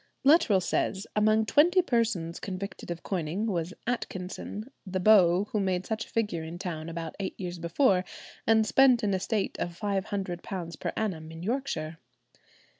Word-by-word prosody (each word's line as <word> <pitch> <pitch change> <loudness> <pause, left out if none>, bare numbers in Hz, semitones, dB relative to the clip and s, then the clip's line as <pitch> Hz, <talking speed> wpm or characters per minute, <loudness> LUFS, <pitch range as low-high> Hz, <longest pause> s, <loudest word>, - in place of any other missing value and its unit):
Luttrell 275 - +5
says, 190 +2 -1
among 215 +1 +3
twenty 345 - +5
persons 220 - 0
convicted 195 0 -6
of 170 -1 -5
coining 180 +2 -2
was 175 -5 -1
Atkinson, 210 0 -4
the 185 -1 -3
beau 185 -2 +6
who 215 - 0
made 185 -2 0
such 220 0 -2
a - - -19
figure 210 -7 -1
in 165 +2 -7
town 170 -3 -5
about 165 -1 -5
eight 195 - -4
years 175 -2 -5
before, 180 - +2 0.4
and 220 -1 +5
spent 255 +1 +5
an 200 -2 +1
estate 195 +2 -1
of 175 -1 -3
£500 190 -4 -3
per - - -2
annum 165 -8 -2
in 165 +1 -8
Yorkshire. 180 - -2
190 Hz, 155 wpm, -28 LUFS, 175-220 Hz, 0.4 s, beau